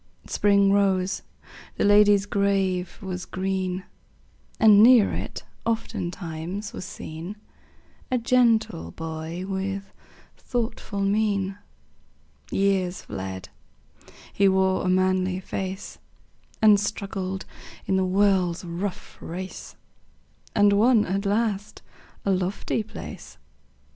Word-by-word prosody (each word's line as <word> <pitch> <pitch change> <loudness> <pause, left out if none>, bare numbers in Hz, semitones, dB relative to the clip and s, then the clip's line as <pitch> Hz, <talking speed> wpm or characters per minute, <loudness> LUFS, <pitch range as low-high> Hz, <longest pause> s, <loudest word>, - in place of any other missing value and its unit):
Spring 200 -1 +3
rose; 195 -2 +2 0.5
the - - 0
lady's 205 -1 +6
grave 195 -3 0
was 180 -1 -4
green; 185 -1 -2 0.8
And 210 -2 +7
near 235 -2 +7
it, - - -5 0.2
oftentimes, 180 -3 -4
was - - -6
seen 170 +2 -7 0.7
A 255 - +2
gentle 230 - +2
boy 160 - -6
with 195 0 -4 0.4
thoughtful 225 -4 -3
mien. 200 -1 0 0.9
Years 190 -2 0
fled; 95 0 -6 0.8
he 200 - +4
wore 190 0 +2
a 180 - 0
manly 185 0 +2
face, 190 +1 -5 0.6
And 210 -2 +7
struggled 195 -2 -3 0.4
in 190 - +1
the 190 - +2
world's 185 -2 +2
rough 180 +3 -5
race, 185 +3 -7 0.8
And 205 -1 +5
won 220 +1 +4
at 195 +2 -1
last 210 -1 -1 0.4
a 200 - +2
lofty 190 +4 -1
place. 215 - -9
195 Hz, 100 wpm, -25 LUFS, 185-205 Hz, 0.9 s, And